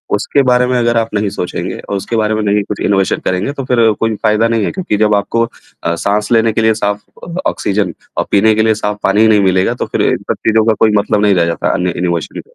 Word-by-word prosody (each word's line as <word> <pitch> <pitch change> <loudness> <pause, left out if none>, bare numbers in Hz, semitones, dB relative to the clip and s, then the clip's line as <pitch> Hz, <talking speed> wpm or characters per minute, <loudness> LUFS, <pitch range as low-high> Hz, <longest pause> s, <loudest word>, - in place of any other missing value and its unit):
उसके 140 - +1
बारे 125 -1 +3
में 125 0 0
अगर 120 -1 +1
आप 115 0 0
नहीं 105 -1 0
सोचेंगे 90 -2 -4
और 100 - -5
उसके 100 +4 -4
बारे 110 0 +1
में 110 - -1
नहीं 105 0 +1
कुछ 105 - -5
इनोवेशन 95 -2 +1
करेंगे 95 +8 -1
तो 135 -2 -5
फिर 115 -3 +3
कोई 115 -1 0
फायदा 110 +1 +3
नहीं 115 -2 0
है - - -2
क्योंकि 175 - -2
जब 105 0 +3
आपको 115 +3 0 0.4
अ, 85 +1 0
साँस 105 +5 -1
लेने 115 -1 +3
के 115 - 0
लिए 110 0 +3
साफ 105 -1 -2 0.5
ऑक्सीजन 100 -3 -1 0.2
और - - 0
पीने 110 +2 +4
के 110 - +2
लिए 110 - +3
साफ 105 -1 -3
पानी 100 +2 +2
ही 110 - +5
नहीं 105 -2 +4
मिलेगा, 95 0 +2
तो - - -4
फिर - - -2
इन - - 0
सब - - -1
चीज़ 110 - +3
का - - +4
कोई 110 -1 +4
मतलब 105 0 0
नहीं 100 -2 +3
रह 85 - +2
जाता 85 0 -2
है - - +1
अन्य 90 -1 -1
इनोवेशन 85 -2 -1
में। - - -5
105 Hz, 265 wpm, -14 LUFS, 100-115 Hz, 0.5 s, ही